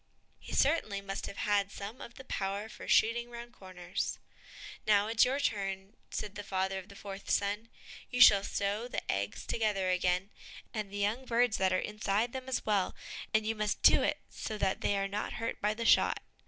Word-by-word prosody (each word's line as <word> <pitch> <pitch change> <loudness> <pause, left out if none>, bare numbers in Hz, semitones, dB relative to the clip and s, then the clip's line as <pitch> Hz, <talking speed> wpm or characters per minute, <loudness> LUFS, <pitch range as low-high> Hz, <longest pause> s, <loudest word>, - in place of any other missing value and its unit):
He - - -10
certainly 270 -9 +2
must 195 0 -5
have 200 - -8
had 200 -1 +1
some 205 +5 -7
of 235 - -9
the 265 - -10
powder 200 -2 -3
for - - -10
shooting 235 +2 +3
round 240 0 -9
corners. 185 -3 -4 0.7
"Now 205 -1 +5
it's 225 +1 +4
your 265 +3 0
turn," 195 -6 -2 0.2
said 205 -1 -4
the 205 - -6
father 190 -1 -1
to 190 - -18
the 200 - -13
fourth 195 0 -8
son; 205 +3 0 0.4
"you 250 - -3
shall 200 -5 +9
sew 205 +4 -1
the - - -3
eggs 100 +1 -3
together 200 -4 0
again, 180 +2 +1 0.4
and 215 -3 -3
the 200 - -5
young 210 +6 0
birds 240 -1 +2
that 190 -1 +2
are 185 - +3
inside 210 +3 -1
them 260 0 -5
as 260 - -1
well, 205 -3 +1 0.4
and 215 0 +2
you 225 - +1
must 210 -1 -2
do - - +7
it - - +1
so 215 - -5
that 190 -2 0
they 205 - +1
are 195 0 0
not 205 +2 -3
hurt 230 +1 -4
by 210 +1 +1
the 230 +1 -3
shot." - - +4
205 Hz, 200 wpm, -32 LUFS, 195-230 Hz, 0.7 s, shall